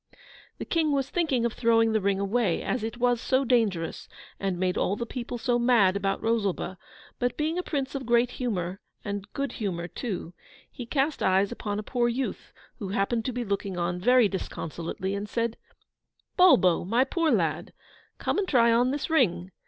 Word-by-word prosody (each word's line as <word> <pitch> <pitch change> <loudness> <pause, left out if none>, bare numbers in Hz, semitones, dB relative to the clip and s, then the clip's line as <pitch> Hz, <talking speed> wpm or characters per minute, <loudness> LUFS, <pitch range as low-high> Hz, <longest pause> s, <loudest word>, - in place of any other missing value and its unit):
The - - -5
King 315 -3 +1
was 275 -1 -1
thinking 290 -9 +1
of 235 - -1
throwing 225 -1 +3
the 220 -1 +1
ring 195 0 +1
away, 200 -2 0
as 250 - -2
it 225 +2 -4
was 245 -1 +2
so 265 +1 +1
dangerous 215 -10 0 0.3
and 195 -2 -1
made 185 -1 0
all 200 - 0
the 235 - -4
people 245 0 -5
so 240 +1 +1
mad 235 -6 +4
about 195 0 -1
Rosalba; 200 -5 -1 0.4
but 245 0 -1
being 315 +3 0
a - - +1
Prince 280 -6 -3
of 265 -3 -5
great 240 +1 +3
humour, 195 -6 -3 0.2
and 205 0 -5
good 280 0 -2
humour 180 -7 -3
too, 180 -2 -5 0.4
he 245 - -8
cast 280 +3 0
eyes 190 +1 +3
upon 205 -1 -4
a 210 - -3
poor 240 +1 0
youth 255 +3 -4 0.3
who 205 - -4
happened 205 +4 0
to 255 - -1
be 245 0 -3
looking 200 -2 -2
on 175 +1 -1
very 250 +3 +5
disconsolately, 190 0 -4
and 200 +1 -4
said 230 -1 -1 0.8
'Bulbo, 185 - +5
my 230 +8 +2
poor 325 +4 0
lad! - - 0 0.5
come - - -1
and 395 - -1
try 235 -6 +4
on 240 +2 +3
this 285 +2 -2
ring. 190 - +1
230 Hz, 185 wpm, -27 LUFS, 195-255 Hz, 0.8 s, very